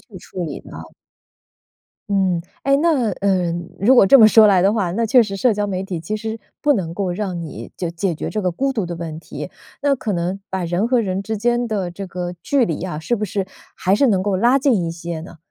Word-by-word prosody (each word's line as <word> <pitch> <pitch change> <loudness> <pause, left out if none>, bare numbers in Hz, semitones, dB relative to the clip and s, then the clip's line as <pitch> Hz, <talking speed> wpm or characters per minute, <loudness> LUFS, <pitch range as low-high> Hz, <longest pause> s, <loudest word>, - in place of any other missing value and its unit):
去 195 -6 -11
处 180 0 -6
理 150 -4 -5
呢？ - - -10 1.3
嗯， 190 -4 +1 0.2
哎， 275 0 +3
那 285 -10 +2
呃， 185 -3 +2 0.3
如 245 +6 +5
果 240 - +7
这 270 +7 +8
么 220 -1 +9
说 220 0 +7
来 195 -3 +5
的 195 - +4
话， 190 -6 0
那 225 +5 0
确 245 +2 +6
实 195 -2 -4
社 230 +1 +2
交 205 0 -1
媒 185 -2 -2
体 190 -3 -4
其 170 +7 -4
实 220 +1 -4 0.2
不 295 -1 +3
能 170 -6 -2
够 190 0 -2
让 185 -2 -3
你 120 -8 -8
就 175 - -2
解 170 +2 -2
决 - - -4
这 215 -2 -3
个 180 - +1
孤 270 +11 -1
独 215 -5 -1
的 175 - -5
问 160 -2 -6
题， - - -8 0.3
那 285 -1 +2
可 220 -5 -3
能 180 +2 -2
把 190 -2 -2
人 175 +6 0
和 245 -1 +2
人 195 -2 -2
之 220 +1 -3
间 240 +2 +1
的 195 -5 -2
这 195 +2 -7
个 180 0 -5
距 270 -5 +2
离 165 - -3
啊， 175 -5 -4
是 235 +9 -1
不 210 - -2
是 195 0 -2 0.3
还 190 +1 +1
是 275 +7 +3
能 190 -4 +2
够 200 -2 0
拉 240 +7 +4
近 250 -10 +2
一 165 - -2
些 170 -1 -6
呢？ 170 0 -11
195 Hz, 260 characters per minute, -20 LUFS, 175-225 Hz, 1.3 s, 么